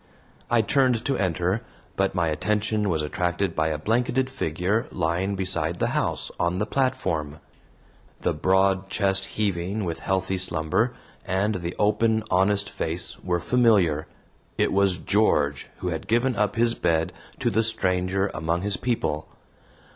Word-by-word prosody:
I 120 -2 +3
turned 125 -2 +2
to 140 - +1
enter, 95 +2 0 0.3
but - - 0
my 85 -2 +1
attention 105 +5 0
was 80 -3 0
attracted 90 +3 -1
by 80 0 +1
a 80 -1 -1
blanketed 125 +8 0
figure 100 0 -1
lying 90 +5 -1
beside 90 -3 -1
the - - 0
house, - - -1
on 85 +1 +1
the 105 - 0
platform. 110 - -1 0.8
The - - +1
broad 95 +3 +2
chest 95 -1 +1
heaving 100 0 -2
with 85 -2 -3
healthy 95 0 -1
slumber, 80 -4 +1 0.3
and 100 +3 0
the 85 +1 -4
open, 110 +1 +2
honest 100 +2 +3
face 80 - -4
were 90 +5 -1
familiar. 100 -9 +3 0.5
It - - +1
was 95 -2 +3
George, 75 -9 +1
who 90 - -3
had 80 -2 -4
given 120 +3 +2
up 105 0 0
his 115 0 +2
bed 80 -4 0 0.2
to - - 0
the 110 - +3
stranger 95 -3 0
among 85 +3 -1
his 105 0 +1
people. 80 -11 -1
95 Hz, 145 wpm, -25 LUFS, 85-110 Hz, 0.8 s, I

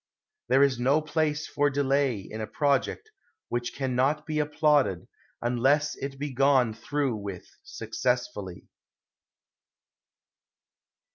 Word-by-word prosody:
There 130 +3 +5
is 135 -3 +2
no 135 +5 +3
place 155 0 -1
for 145 0 +1
delay 140 -3 +1
in 110 +3 -7
a 110 - -3
project 145 - 0 0.4
which 120 0 -3
can 135 -2 -2
not 145 +4 +1
be 155 -1 -2
applauded 150 - +2 0.4
unless 135 +5 +2
it 135 0 -6
be 145 0 -4
gone 130 -3 +3
through 130 +1 -2
with 100 -3 -7 0.2
successfully. 115 -4 -3
135 Hz, 115 wpm, -27 LUFS, 120-145 Hz, 0.4 s, There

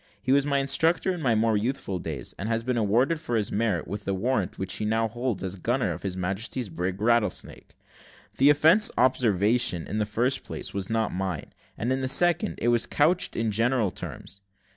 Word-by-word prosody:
He 130 - -2
was 140 +1 +3
my 140 -1 +2
instructor 160 +7 +1
in 175 - -6
my 120 -6 +2
more 110 0 +2
youthful 105 -3 -2
days, 80 -4 -5
and 100 +4 -3
has 115 0 0
been 125 +1 -1
rewarded 120 +10 +2
for 120 -6 -3
his 105 -3 -1
merit, 105 -6 0
with 100 +2 -5
the 100 - -2
warrant 105 -1 -1
which 95 -1 -2
he - - -3
now 110 +1 +1
holds 120 -3 -3
as 95 +1 -3
gunner 120 +8 0
of - - -6
His 95 -2 -4
Majesty's 100 +6 -2
brig; 90 +3 -3
Rattlesnake. 110 -3 -1 0.6
The 135 +2 +6
offensive 160 +9 +4
observation, 115 -5 +2
in 105 - -3
the 105 - 0
first 120 +5 0
place - - -6
was 100 -1 -4
not 110 0 0
mine; 90 -4 -4 0.2
and, 120 +4 -1
in 135 - -2
the 130 - -1
second, 175 +8 +3
it 120 - +3
was 120 -1 +2
couched 165 +5 +1
in 115 -1 0
general 115 -1 +1
terms. 100 - -8
115 Hz, 205 wpm, -26 LUFS, 100-130 Hz, 0.6 s, The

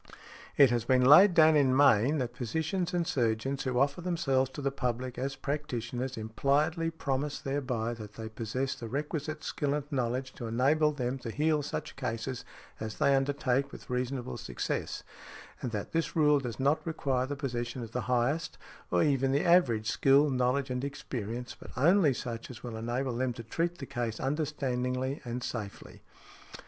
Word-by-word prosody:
It 140 -4 +7
has 120 -2 +1
been 125 +1 +3
laid 175 +7 +8
down 160 -1 +7
in 135 -3 +4
Maine, 140 +1 +5
that 125 -3 -3
physicians 160 - -2
and 175 -2 0
surgeons 135 -2 0
who 130 -1 0
offer 140 +5 +1
themselves 145 -7 +1
to 145 - -5
the 140 - +1
public 125 -1 -3
as 135 +1 -2
practitioners 130 -3 -3
impliedly 145 - +1
promise 145 -3 -2
thereby 125 -4 -2
that 105 -3 -9
they 110 0 -6
possess 115 +4 -3
the 115 - -7
requisite 150 +4 -3
skill 145 -1 -1
and 150 - -2
knowledge 130 0 -1
to 120 - -6
enable 145 +7 +3
them 130 -2 -3
to 120 - -6
heal 150 +5 +1
such 145 - -5
cases 125 -1 -4 0.4
as 110 -1 -5
they 140 - +4
undertake 135 0 0
with - - -10
reasonable 125 - -2
success; - - -3 0.6
and 125 - -2
that 105 -3 -4
this 165 0 -1
rule 150 -2 +5
does 120 -4 -5
not 140 +4 +2
require 135 -5 -1
the 145 - -3
possession 120 -3 -3
of 115 - -8
the 125 - -2
highest, 125 +6 0 0.3
or 90 - +3
even 135 -2 +2
the 140 +2 +1
average 150 -12 +4
skill, 140 +4 +4
knowledge 130 +1 +1
and 125 +1 -2
experience, 125 -4 -5
but - - -11
only 165 +3 +5
such 120 -2 -5
as 125 -3 -10
will 120 -2 -5
enable 120 +3 -2
them 125 0 0
to 115 - -8
treat 170 +9 -2
the 135 - -6
case 120 -3 -3
understandingly 130 -2 -1
and 120 0 -4
safely. 105 -6 -6
130 Hz, 175 wpm, -30 LUFS, 120-145 Hz, 0.6 s, laid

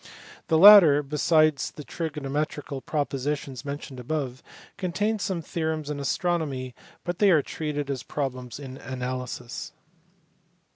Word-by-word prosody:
The 160 - +3
latter, 170 -6 +9
besides 155 +1 +2
the 150 - -10
trigonometrical 145 -2 -4
propositions 140 -3 -3
mentioned 140 -2 -6
above, 130 -1 -3 0.3
contains 205 +3 -1
some 180 -3 -2
theorems 160 -3 -3
in 145 - -4
astronomy 140 -4 -1 0.3
but 175 0 -4
they 205 - +5
are 155 -6 +5
treated 150 -1 -4
as 130 -3 -3
problems 130 -3 -4
in 135 -2 -8
analysis. 125 -1 -5
145 Hz, 115 wpm, -26 LUFS, 135-160 Hz, 0.3 s, latter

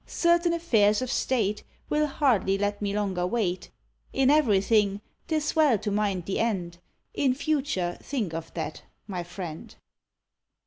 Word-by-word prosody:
Certain 340 0 +2
affairs 225 -11 +2
of 255 - -3
state 215 -7 0 0.3
Will 300 0 +1
hardly 235 -10 +2
let 205 +1 -1
me 200 -1 -1
longer 195 -3 -1
wait; 185 -4 -1 0.4
In 270 0 +3
everything 210 -7 +3 0.3
'tis 310 -1 -1
well 300 -8 +4
to 210 0 -3
mind 200 -4 0
the 195 - -2
end, 180 -7 -1 0.3
In 260 -3 +1
future 270 - -1
think 225 - -3
of 165 0 -5
that, 160 -2 -4 0.2
my 185 -4 -4
friend." 175 -2 -8
210 Hz, 140 wpm, -27 LUFS, 190-275 Hz, 0.4 s, well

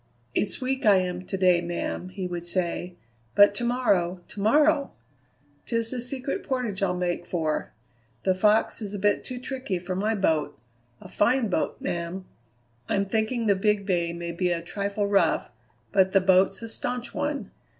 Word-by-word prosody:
"It's 205 - 0
weak 260 +1 -2
I 210 -2 +6
am 180 0 -2
to 195 - -2
day, 180 -2 +4
ma'am," 175 +1 -4
he 185 0 -5
would 175 -1 -4
say, 175 0 -1 0.4
"but 205 0 +7
to 220 - -3
morrow, 195 -8 +1
to 205 - -7
morrow! 295 +6 +3 0.7
'Tis 230 -1 +1
the 250 -2 -3
Secret 260 +2 -3
Portage 245 -7 -2
I'll 180 -2 +1
make 175 -1 -2
for; 160 -3 -1 0.5
the 190 - +3
Fox 210 +5 +2
is 205 -1 -4
a - - -2
bit 205 +1 +1
too 255 -1 -6
tricky 255 -6 -3
for 180 +1 -4
my 215 +4 0
boat 160 -7 0 0.4
a - - -11
fine 235 +1 +2
boat, 170 - -1
ma'am. 170 +2 -3 0.6
I'm 200 0 +1
thinking 220 +3 0
the 205 - +5
Big 205 +1 +1
Bay 175 -3 0
may 170 0 -5
be 180 +1 0
a 170 -1 -1
trifle 200 +3 -2
rough, 200 -1 +2 0.4
but 190 -1 +3
the 195 - +6
boat's 190 +2 +3
a 230 - -6
staunch 245 +2 -4
one. 290 -7 -3
195 Hz, 175 wpm, -26 LUFS, 180-230 Hz, 0.7 s, but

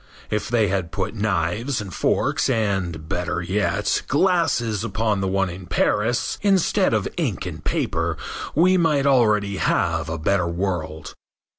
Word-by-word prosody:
If 105 -1 -1
they 115 -3 +3
had 95 -3 -2
put 80 - -3
knives 105 - -1
and 100 -3 -6
forks - - +1
and, 95 -8 -1
better 90 -1 -2
yet, 100 +3 0
glasses 145 - +1
upon 105 -1 0
the 95 - 0
one 95 0 +1
in 90 +1 -9
Paris, 110 +7 0
instead 195 -3 +2
of - - 0
ink - - -1
and - - -7
paper, - - -1 0.4
we 185 +5 +4
might 150 -5 +2
already 105 -7 +3
have 80 -4 0
a 80 - -3
better 90 +3 +1
world. 85 -3 -3
100 Hz, 145 wpm, -22 LUFS, 90-115 Hz, 0.4 s, we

